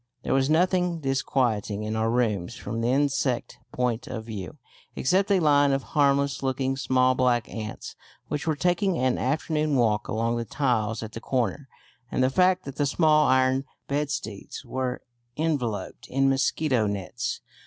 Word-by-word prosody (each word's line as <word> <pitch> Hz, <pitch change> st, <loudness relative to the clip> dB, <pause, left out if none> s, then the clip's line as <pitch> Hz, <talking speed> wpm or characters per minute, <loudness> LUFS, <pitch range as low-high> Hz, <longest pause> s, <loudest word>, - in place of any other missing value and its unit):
There -, -, 0 dB
was 135 Hz, +1 st, +2 dB
nothing 180 Hz, +1 st, +2 dB
disquieting 125 Hz, -7 st, 0 dB
in 110 Hz, +1 st, -3 dB
our 110 Hz, 0 st, +1 dB
rooms 115 Hz, -5 st, 0 dB
from 115 Hz, 0 st, -4 dB
the 115 Hz, -, 0 dB
insect 135 Hz, -1 st, 0 dB
point 125 Hz, -2 st, -1 dB
of 110 Hz, -3 st, -5 dB
view, 100 Hz, -6 st, -7 dB, 0.4 s
except 190 Hz, +9 st, +2 dB
a 195 Hz, -2 st, +4 dB
line 145 Hz, -3 st, +4 dB
of 135 Hz, -1 st, 0 dB
harmless 140 Hz, -2 st, +2 dB
looking 135 Hz, 0 st, -1 dB
small 130 Hz, -1 st, +2 dB
black 125 Hz, -3 st, +1 dB
ants 110 Hz, -1 st, -6 dB, 0.3 s
which 150 Hz, +1 st, -3 dB
were 155 Hz, -, +2 dB
taking 180 Hz, +3 st, +1 dB
an 130 Hz, 0 st, +1 dB
afternoon 150 Hz, +2 st, 0 dB
walk 110 Hz, -4 st, +2 dB
along 115 Hz, +2 st, 0 dB
the 120 Hz, -, -1 dB
tiles 115 Hz, -3 st, 0 dB
at 110 Hz, -, -7 dB
the 115 Hz, -, -8 dB
corner, 130 Hz, +2 st, -1 dB, 0.4 s
and 130 Hz, -, +1 dB
the 130 Hz, -, +2 dB
fact 185 Hz, +4 st, +3 dB
that 140 Hz, 0 st, -7 dB
the 145 Hz, -, +1 dB
small 155 Hz, 0 st, +4 dB
iron 130 Hz, +1 st, +3 dB, 0.2 s
bedsteads 140 Hz, -6 st, -4 dB
were 125 Hz, +1 st, -3 dB, 0.3 s
enveloped 125 Hz, -11 st, -2 dB
in 135 Hz, +1 st, +1 dB
mosquito 135 Hz, -3 st, +1 dB
nets. 100 Hz, +5 st, -3 dB
130 Hz, 160 wpm, -26 LUFS, 115-145 Hz, 0.4 s, a